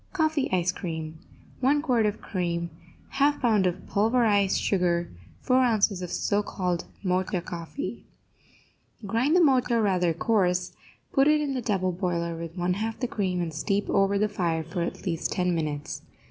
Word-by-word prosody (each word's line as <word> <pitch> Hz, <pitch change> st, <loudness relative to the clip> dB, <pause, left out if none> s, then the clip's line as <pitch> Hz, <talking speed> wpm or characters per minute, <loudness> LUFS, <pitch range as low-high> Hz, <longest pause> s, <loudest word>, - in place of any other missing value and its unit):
COFFEE 315 Hz, -5 st, +1 dB
ICE 180 Hz, -1 st, +2 dB
CREAM 160 Hz, -3 st, -6 dB, 0.4 s
1 285 Hz, +3 st, +2 dB
quart 240 Hz, -7 st, +2 dB
of 210 Hz, 0 st, -4 dB
cream 170 Hz, -3 st, -2 dB, 0.5 s
1/2 290 Hz, +1 st, +3 dB
pound 215 Hz, -6 st, +3 dB
of 175 Hz, -, -3 dB
pulverized 210 Hz, -2 st, +2 dB
sugar 175 Hz, -3 st, +1 dB, 0.3 s
4 255 Hz, -, +2 dB
ounces 215 Hz, -6 st, +2 dB
of 180 Hz, -, -4 dB
so 205 Hz, +4 st, 0 dB
called 180 Hz, -4 st, -2 dB, 0.2 s
Mocha 185 Hz, 0 st, 0 dB
coffee 175 Hz, -, -6 dB, 1.0 s
Grind 235 Hz, -, +1 dB
the 360 Hz, -, +6 dB
Mocha 250 Hz, -5 st, +3 dB
rather 185 Hz, -5 st, +2 dB
coarse, 180 Hz, 0 st, +1 dB, 0.4 s
put 270 Hz, 0 st, +4 dB
it 305 Hz, 0 st, +5 dB
in 290 Hz, -2 st, -1 dB
the 255 Hz, -, -2 dB
double 190 Hz, -5 st, 0 dB
boiler 170 Hz, -2 st, -2 dB
with 165 Hz, +1 st, -7 dB
one 180 Hz, +1 st, +1 dB
half 220 Hz, +3 st, -3 dB
the 250 Hz, -, -1 dB
cream, 185 Hz, -5 st, -1 dB
and 165 Hz, -2 st, -4 dB
steep 200 Hz, +6 st, -1 dB
over 195 Hz, 0 st, +3 dB
the 210 Hz, +1 st, +2 dB
fire 170 Hz, -5 st, -1 dB
for 165 Hz, +2 st, -4 dB
at 170 Hz, -, -4 dB
least 165 Hz, -3 st, -1 dB
ten 180 Hz, -1 st, +1 dB
minutes. 150 Hz, -3 st, -3 dB
190 Hz, 165 wpm, -26 LUFS, 175-230 Hz, 1.0 s, the